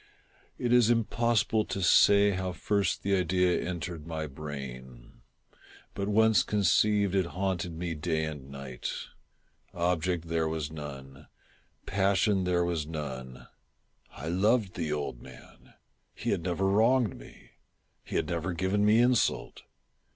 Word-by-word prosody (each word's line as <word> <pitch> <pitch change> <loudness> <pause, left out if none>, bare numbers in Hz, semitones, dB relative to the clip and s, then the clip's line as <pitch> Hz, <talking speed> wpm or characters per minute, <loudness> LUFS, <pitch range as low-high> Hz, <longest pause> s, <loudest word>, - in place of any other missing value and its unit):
It 120 0 0
is 120 -2 +5
impossible 115 -1 +2
to 95 - -3
say 100 +3 +6
how 95 -1 -3
first 100 +3 -1
the 100 0 +2
idea 90 0 +1
entered 85 -2 -5
my 80 -1 -3
brain; 65 -4 -9 0.7
but 100 0 -3
once 110 +1 +4
conceived, 105 0 +2
it 95 -3 +1
haunted 90 -3 -1
me 85 +1 -4
day 80 0 -1
and 75 -3 -7
night. 70 -3 -6 0.8
Object 85 -1 0
there 80 -1 0
was 80 -2 -3
none. 70 -2 -9 0.6
Passion 100 0 +1
there 90 -1 +1
was 85 -4 -2
none. 65 -5 -7 0.7
I 75 - -8
loved 100 +3 +2
the 80 -4 -3
old 75 -5 -3
man. 65 -2 -16 0.4
He - - -2
had 95 - 0
never 90 +2 -1
wronged 110 +3 +3
me. - - -15 0.5
He - - -7
had - - +1
never 85 +1 -2
given 95 +4 0
me 105 +1 +5
insult. 120 0 +1
90 Hz, 135 wpm, -29 LUFS, 75-100 Hz, 0.8 s, say